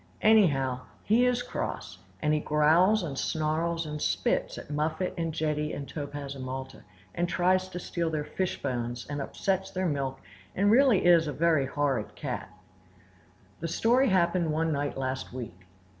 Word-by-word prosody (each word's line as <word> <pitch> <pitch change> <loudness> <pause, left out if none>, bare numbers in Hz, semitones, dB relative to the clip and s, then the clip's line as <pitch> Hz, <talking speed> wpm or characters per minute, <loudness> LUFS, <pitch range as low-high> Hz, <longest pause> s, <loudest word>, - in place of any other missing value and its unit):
Anyhow, 145 -13 +4 0.2
he 240 +4 +4
is 245 0 +1
cross, 245 - -5 0.2
and 150 0 +3
he 155 - +2
growls 165 +8 +3
and 140 -5 -4
snarls 165 +2 -1
and 150 -1 -5
spits - - 0
at - - -9
Muffet 155 +4 -1
and 165 -2 -2
Jetty 150 -1 -1
and 140 - -5
Topaz 145 -2 -6
and 135 -2 -7
Malta, 130 +1 -6 0.3
and 175 0 -1
tries 185 +1 +2
to 180 - -6
steal 170 -1 -2
their 155 -2 -2
fishbones, 125 -10 -3
and 145 0 -4
upsets 190 +6 -1
their 185 0 -2
milk, 135 -4 -2 0.4
and 200 +2 +3
is - - +5
really 250 -5 +5
a 165 -3 +5
very 155 -4 +2
horrid 135 -5 -1
cat. - - -5 1.1
The 165 - -3
story 245 +9 +3
happened 175 -3 +2
one 160 +1 0
night 145 -1 -2
last 130 -1 -3
week. 95 -8 -8
155 Hz, 160 wpm, -28 LUFS, 140-180 Hz, 1.1 s, is